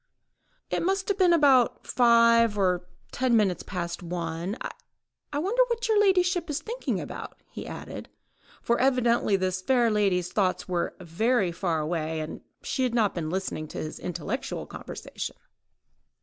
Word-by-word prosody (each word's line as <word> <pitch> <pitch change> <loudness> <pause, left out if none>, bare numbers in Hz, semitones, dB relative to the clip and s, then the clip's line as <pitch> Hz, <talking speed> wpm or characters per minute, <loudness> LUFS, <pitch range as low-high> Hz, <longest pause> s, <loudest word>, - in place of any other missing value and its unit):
"It - - 0
must 385 +2 0
have 400 0 0
been 365 -2 +5
about 275 -7 +4
five 230 -2 +5
or 180 -2 +1 0.2
ten 245 -2 +2
minutes 195 -5 +1
past 170 -1 -4
one.... 170 +3 -4 0.7
I 290 - -2
wonder 400 +11 +2
what 470 0 -1
your 435 -2 +4
ladyship 360 -3 +2
is 295 +1 -1
thinking 465 +9 -3
about," - - -7
he - - -7
added, - - -8 0.5
for 235 - +1
evidently 240 -5 +3
the 185 -1 0
fair 230 +6 +2
lady's 190 -4 +1
thoughts 195 -1 0
were 175 -2 -1
very 185 +3 +1
far 170 -2 -1
away, 160 0 -2
and 155 0 -6 0.2
she 265 - -2
had 250 -2 +1
not 215 -4 +2
been 160 -3 -3
listening 185 -3 -3
to - - -9
his 155 - -5
intellectual 180 - -4
conversation. - - -7
215 Hz, 150 wpm, -27 LUFS, 180-270 Hz, 0.7 s, been